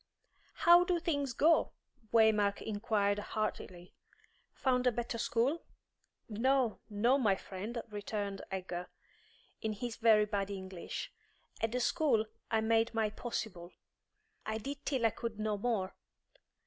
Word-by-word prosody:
"How 345 Hz, +1 st, +7 dB
do 360 Hz, -1 st, +1 dB
things 285 Hz, -6 st, -1 dB
go?" 315 Hz, +7 st, +3 dB, 0.4 s
Waymark 215 Hz, -3 st, +4 dB
inquired 205 Hz, -1 st, 0 dB
heartily. 205 Hz, -4 st, -4 dB, 0.6 s
"Found 255 Hz, -1 st, +1 dB
a -, -, +5 dB
better 235 Hz, 0 st, -3 dB
school?" 250 Hz, +9 st, +1 dB, 0.7 s
"No, 245 Hz, +1 st, +1 dB
no, 235 Hz, +6 st, +3 dB
my 210 Hz, -6 st, +3 dB
friend," 205 Hz, +5 st, -6 dB
returned 205 Hz, -2 st, -4 dB
Egger, 180 Hz, -2 st, -4 dB, 0.7 s
in 220 Hz, -1 st, -1 dB
his 230 Hz, +2 st, -5 dB
very 220 Hz, -2 st, +5 dB
bad 200 Hz, -1 st, -2 dB
English. 190 Hz, -3 st, -6 dB, 0.5 s
"At 225 Hz, -, +1 dB
the 250 Hz, -, 0 dB
school 245 Hz, -3 st, +2 dB, 0.2 s
I 220 Hz, -1 st, +2 dB
made 225 Hz, +1 st, +2 dB
my 220 Hz, -2 st, +1 dB
possible; 205 Hz, -6 st, -5 dB, 0.7 s
I 220 Hz, 0 st, -2 dB
did 275 Hz, +5 st, -6 dB
till 260 Hz, -5 st, +1 dB
I 225 Hz, -, +4 dB
could 230 Hz, -1 st, -5 dB
no 215 Hz, -1 st, 0 dB
more. 205 Hz, -3 st, -1 dB
220 Hz, 130 wpm, -33 LUFS, 205-245 Hz, 0.7 s, How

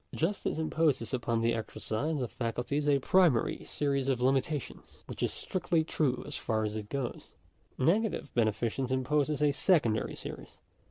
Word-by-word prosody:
Justice 180 Hz, +2 st, -1 dB
imposes 155 Hz, -6 st, +1 dB
upon 115 Hz, -2 st, 0 dB
the 115 Hz, +1 st, +2 dB
exercise 115 Hz, +6 st, -2 dB
of 125 Hz, -, -3 dB
faculties 125 Hz, +5 st, -1 dB
a 140 Hz, -, +5 dB
primary 155 Hz, -3 st, +3 dB
series 140 Hz, -2 st, -1 dB
of 130 Hz, -3 st, +1 dB
limitations, 135 Hz, +3 st, -1 dB
which -, -, -8 dB
is -, -, +1 dB
strictly 175 Hz, -3 st, 0 dB
true 140 Hz, -5 st, 0 dB
as -, -, -5 dB
far 110 Hz, -1 st, -1 dB
as 105 Hz, 0 st, -2 dB
it 105 Hz, -1 st, -5 dB
goes. 135 Hz, -3 st, -4 dB, 0.5 s
Negative 190 Hz, -, +1 dB
beneficence 120 Hz, +3 st, 0 dB
imposes 145 Hz, +3 st, +1 dB
a 145 Hz, -, +4 dB
secondary 140 Hz, -, +2 dB
series. -, -, -8 dB
135 Hz, 150 wpm, -31 LUFS, 115-155 Hz, 0.5 s, a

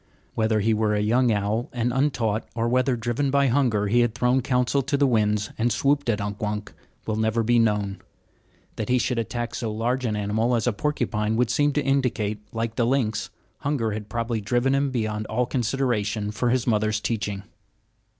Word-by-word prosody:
Whether 110 Hz, -1 st, +1 dB
he 110 Hz, +2 st, +2 dB
were 105 Hz, -1 st, +1 dB
a -, -, +1 dB
young 120 Hz, +4 st, +3 dB
owl 105 Hz, +3 st, -1 dB
and 120 Hz, 0 st, -1 dB
untaught, 120 Hz, -6 st, 0 dB
or 115 Hz, 0 st, 0 dB
whether, 130 Hz, +1 st, +2 dB
driven 120 Hz, +4 st, -1 dB
by 140 Hz, 0 st, +3 dB
hunger, 120 Hz, -6 st, +2 dB
he 115 Hz, +4 st, +2 dB
had 120 Hz, -1 st, +2 dB
thrown 125 Hz, +1 st, +2 dB
counsel 125 Hz, +2 st, +1 dB
to 140 Hz, +2 st, -1 dB
the 140 Hz, -, +3 dB
winds 105 Hz, -4 st, +1 dB
and 120 Hz, +2 st, +2 dB
swooped 140 Hz, 0 st, +1 dB
at 110 Hz, -2 st, +1 dB
Unk 100 Hz, 0 st, -4 dB
Wunk, 105 Hz, 0 st, -3 dB, 0.3 s
will 110 Hz, -1 st, -2 dB
never 110 Hz, +1 st, +1 dB
be 120 Hz, +1 st, +3 dB
known. 105 Hz, -3 st, 0 dB, 0.8 s
That 110 Hz, -, -3 dB
he 125 Hz, -, +4 dB
should 125 Hz, -1 st, 0 dB
attack 120 Hz, +1 st, -3 dB
so 115 Hz, -2 st, -3 dB
large 120 Hz, +4 st, -1 dB
an 110 Hz, -2 st, 0 dB
animal 110 Hz, +4 st, 0 dB
as 115 Hz, -, 0 dB
the 120 Hz, -, +1 dB
porcupine 110 Hz, -4 st, -1 dB
would 125 Hz, 0 st, +1 dB
seem 145 Hz, 0 st, +2 dB
to 150 Hz, -, 0 dB
indicate 115 Hz, -6 st, 0 dB
that, 105 Hz, -, -20 dB
like 115 Hz, 0 st, -2 dB
the 115 Hz, -, +2 dB
lynx, 120 Hz, -5 st, 0 dB, 0.3 s
hunger 135 Hz, -6 st, -1 dB
had 105 Hz, 0 st, -5 dB
probably 115 Hz, -1 st, -2 dB
driven 120 Hz, +6 st, +1 dB
him 140 Hz, 0 st, +1 dB
beyond 110 Hz, -4 st, -2 dB
all 125 Hz, +3 st, 0 dB
consideration 115 Hz, -5 st, -1 dB
for 120 Hz, +3 st, 0 dB
his 125 Hz, 0 st, +1 dB
mother's 110 Hz, -2 st, +1 dB
teaching. 105 Hz, -3 st, -3 dB
115 Hz, 200 wpm, -24 LUFS, 105-125 Hz, 0.8 s, he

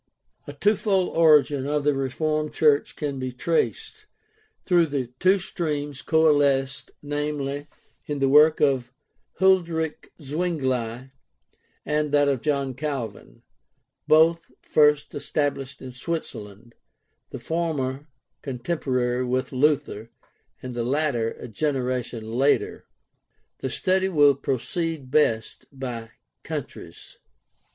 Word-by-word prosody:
A 145 Hz, -, -7 dB
twofold 195 Hz, +2 st, +1 dB
origin 150 Hz, -4 st, +4 dB
of 150 Hz, 0 st, 0 dB
the 145 Hz, 0 st, +3 dB
Reformed 155 Hz, +3 st, -2 dB
church 150 Hz, -2 st, +3 dB
can 140 Hz, -3 st, -3 dB
be 130 Hz, 0 st, -3 dB
traced, 170 Hz, -, -2 dB, 0.6 s
though 175 Hz, -2 st, +4 dB
the 140 Hz, -6 st, -3 dB
two 190 Hz, +2 st, +4 dB
streams 150 Hz, -6 st, -4 dB
coalesced, 145 Hz, -4 st, +2 dB
namely, 145 Hz, -1 st, -3 dB, 0.4 s
in 145 Hz, -, -2 dB
the 135 Hz, -1 st, +2 dB
work 150 Hz, +3 st, +6 dB
of 130 Hz, -4 st, +1 dB, 0.5 s
Huldreich 170 Hz, -4 st, +1 dB
Zwingli 130 Hz, -6 st, -2 dB, 0.7 s
and 150 Hz, +1 st, +1 dB
in -, -, -9 dB
that 145 Hz, 0 st, +3 dB
of 135 Hz, -4 st, 0 dB
John 140 Hz, -3 st, -1 dB
Calvin, 135 Hz, -4 st, -6 dB, 0.6 s
both 165 Hz, +2 st, +4 dB
first 150 Hz, -1 st, +2 dB
established 140 Hz, -2 st, -3 dB
in 130 Hz, -, -7 dB
Switzerland, 120 Hz, -, -6 dB, 0.6 s
the -, -, -7 dB
former 150 Hz, -4 st, -2 dB, 0.3 s
contemporary 125 Hz, -2 st, -1 dB
with 130 Hz, +1 st, -1 dB
Luther 135 Hz, -5 st, 0 dB, 0.5 s
and 130 Hz, -1 st, -5 dB
the 120 Hz, -1 st, -2 dB
latter 130 Hz, -3 st, 0 dB
a -, -, -7 dB
generation 125 Hz, -3 st, -2 dB
later. 135 Hz, +4 st, +1 dB, 0.7 s
The 130 Hz, -, -3 dB
study 190 Hz, +8 st, +1 dB
will 145 Hz, -5 st, +5 dB
proceed 140 Hz, +2 st, -3 dB
best 115 Hz, -7 st, +1 dB
by 125 Hz, -4 st, -6 dB, 0.3 s
countries. -, -, -8 dB
145 Hz, 110 wpm, -24 LUFS, 130-155 Hz, 0.7 s, work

